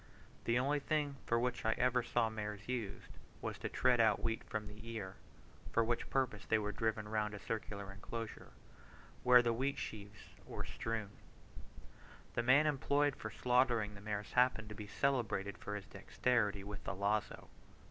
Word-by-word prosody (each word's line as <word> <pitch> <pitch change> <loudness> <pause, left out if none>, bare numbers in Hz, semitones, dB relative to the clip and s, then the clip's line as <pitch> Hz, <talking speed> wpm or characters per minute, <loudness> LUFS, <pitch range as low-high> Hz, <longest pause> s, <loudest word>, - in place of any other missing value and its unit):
The 120 +1 +3
only 140 +4 +2
thing 145 -1 0
for 115 - +3
which 125 0 -1
I 110 - +3
ever 125 +1 +2
saw 120 -1 +1
mares 105 -2 -5
used, 120 -6 -4 0.2
was - - -4
to - - -3
tread 125 -1 +3
out 110 - +4
wheat 115 -1 -1
from 110 0 -4
the 105 +1 -10
ear, 105 -5 -4 0.6
for 115 - +4
which 120 +1 -1
purpose 125 -6 0
they 110 - +2
were 105 -1 -1
driven 110 0 -1
round 105 -1 -1
a - - -7
circular 100 -2 -4
enclosure, 110 +3 -6 0.7
where 125 -1 +7
the 120 -1 +2
wheat 135 +4 0
sheaves 105 -1 -7
were - - -5
strewed. 110 -3 -3 1.2
The - - +1
man 135 +5 +6
employed 145 -1 +2
for 110 - -5
slaughtering 125 -3 +2
the 100 - -11
mares 105 -1 -3
happened 125 -3 +3
to - - -5
be 105 0 -7
celebrated 105 -6 0
for 105 - -4
his 100 -1 -5
dexterity 105 -4 0
with 100 0 -7
the - - -3
lazo. 100 +2 -1
110 Hz, 170 wpm, -36 LUFS, 105-125 Hz, 1.2 s, where